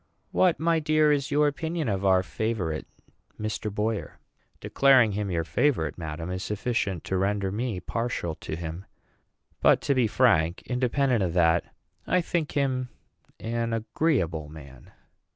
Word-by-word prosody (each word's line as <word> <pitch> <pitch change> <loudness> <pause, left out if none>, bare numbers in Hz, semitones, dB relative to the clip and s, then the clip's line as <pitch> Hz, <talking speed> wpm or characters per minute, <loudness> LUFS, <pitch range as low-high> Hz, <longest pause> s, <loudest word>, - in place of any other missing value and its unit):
"What, 180 -3 +3
my 165 +1 +2
dear, 155 0 +3
is 140 -1 0
your 150 +1 +3
opinion 160 +1 -2
of 100 -2 -1
our 95 -1 +4
favorite, 90 -1 -3 0.5
Mr. 110 0 -3
Boyer?" 105 +1 -2 0.4
"Declaring 130 -5 +4
him 100 0 -2
your 85 -2 0
favorite, 80 - 0
madam, 80 +1 -5
is 95 0 -3
sufficient 105 -4 -2
to 95 - -2
render 100 0 0
me 110 -1 -2
partial 115 -3 -3
to 80 - -6
him; 85 +3 -6 0.8
but - - +5
to 140 - +1
be 125 -4 +2
frank, 100 -8 +2
independent 125 -1 +1
of 90 -3 0
that, 85 -1 +3 0.4
I 180 - +3
think 170 -3 -2
him 130 -3 0 0.5
an 115 0 -2
agreeable 110 - 0
man." 70 -5 -13
110 Hz, 145 wpm, -26 LUFS, 85-135 Hz, 0.8 s, but